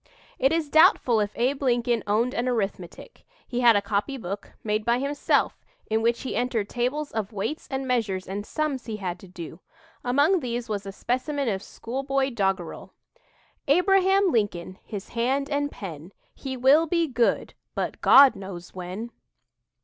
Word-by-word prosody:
It 270 +2 +3
is 325 -2 0
doubtful 300 - +5
if 205 -1 0
Abe 265 +4 0
Lincoln 240 -3 +1
owned 230 +5 +1
an 240 +2 -1
arithmetic. 195 -7 -4 0.2
He 245 - -3
had 235 -3 +6
a 200 - +2
copybook, 205 -1 -3
made 215 0 0
by 235 +2 +2
himself, 280 +2 0 0.3
in 220 0 +2
which 235 +1 +1
he 260 - -4
entered 240 -4 0
tables 265 +5 -2
of 215 -2 -3
weights 215 +9 -4
and 265 -1 -3
measures 215 -7 -1
and 200 +2 -4
"sums" 285 0 -3
he 220 -2 -4
had 180 -3 -4
to 190 - -13
do. 170 -2 -9 0.4
Among 285 +9 +3
these 240 -3 -4
was 205 -2 -4
a - - -4
specimen 260 +6 -2
of 190 -2 -2
schoolboy 270 +5 -2
doggerel: 195 -6 -2 0.7
"Abraham 385 +4 +4
Lincoln, 190 -5 -1
His 205 -2 -7
hand 265 +5 -1
and 285 0 0
pen, 170 -1 -8 0.2
He 265 -2 -6
will 280 +6 +5
be 335 +1 +2
good 245 -5 0 0.2
But - - -3
God 275 -1 +8
knows 185 -3 -9
when!" 185 +6 -6
240 Hz, 160 wpm, -25 LUFS, 205-275 Hz, 0.7 s, God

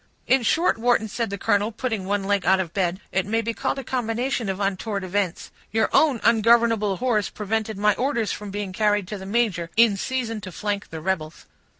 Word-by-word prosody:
"In 265 0 +3
short, 315 +2 +2
Wharton," 235 -1 +2
said 230 +1 -3
the 200 - -4
colonel, 205 +1 +1
putting 220 -3 -3
one 200 +1 0
leg 200 -1 +1
out 190 +3 +4
of 175 -4 -3
bed, 185 -1 0
"it 190 - +1
may 225 +2 +1
be 230 +1 -2
called 270 +3 -2
a 270 - -4
combination 240 -1 -2
of 190 0 -3
untoward 200 +1 -2
events; 185 -1 -2 0.2
your 220 +1 +2
own 285 -7 +4
ungovernable 225 -3 +3
horse 235 -5 0
prevented 215 0 -3
my 210 +1 +3
orders 240 -3 -1
from 210 -1 -6
being 200 -1 -4
carried 205 -1 +1
to 210 - -5
the 190 - -8
major, 200 -6 0
in 230 -3 +6
season 230 -1 -2
to 185 - -8
flank 205 +2 -3
the 160 -1 -7
rebels." 160 -3 -3
210 Hz, 205 wpm, -24 LUFS, 195-230 Hz, 0.2 s, in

